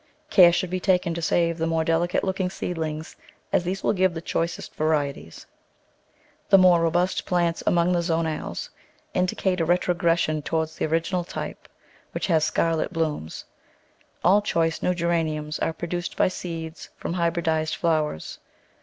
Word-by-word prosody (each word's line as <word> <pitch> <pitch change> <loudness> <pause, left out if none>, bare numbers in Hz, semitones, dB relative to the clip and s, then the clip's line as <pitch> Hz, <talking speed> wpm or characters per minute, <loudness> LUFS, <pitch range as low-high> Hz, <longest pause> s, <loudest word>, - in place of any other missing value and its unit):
Care 175 -3 +8
should 175 +1 -1
be 185 - -1
taken 180 -2 +1
to 170 - -4
save 170 0 +1
the 165 - 0
more 165 0 +1
delicate 165 +2 +1
look 190 0 -2
ing 185 -1 +1
seedlings, 160 -4 -4 0.4
as - - +3
these 185 +2 -3
will - - +2
give 185 -3 +2
the - - -3
choicest 165 0 -3
varieties; 145 - -2 1.0
the 195 - +8
more 180 -2 +6
robust 175 +3 +1
plants 170 -2 +1
among 170 +1 +3
the 175 -1 +2
zonales 165 -2 -2 0.4
indicate 180 0 0
a - - +2
retrogression 170 -2 +1
toward 160 +1 -1
the - - -3
original 165 +3 0
type, 170 - -7 0.5
which - - -2
has 160 -4 +2
scarlet 165 0 0
blooms. 155 - -3 0.8
All 195 +4 +5
choice 165 -5 0
new 180 - +1
Geraniums 160 -3 -1
are - - 0
pro 165 +2 -6
duced 175 0 -4
by - - +3
seeds 165 -3 -6
from - - -4
hybridised 165 -2 0
flowers. 155 - -1
170 Hz, 155 wpm, -25 LUFS, 160-180 Hz, 1.0 s, Care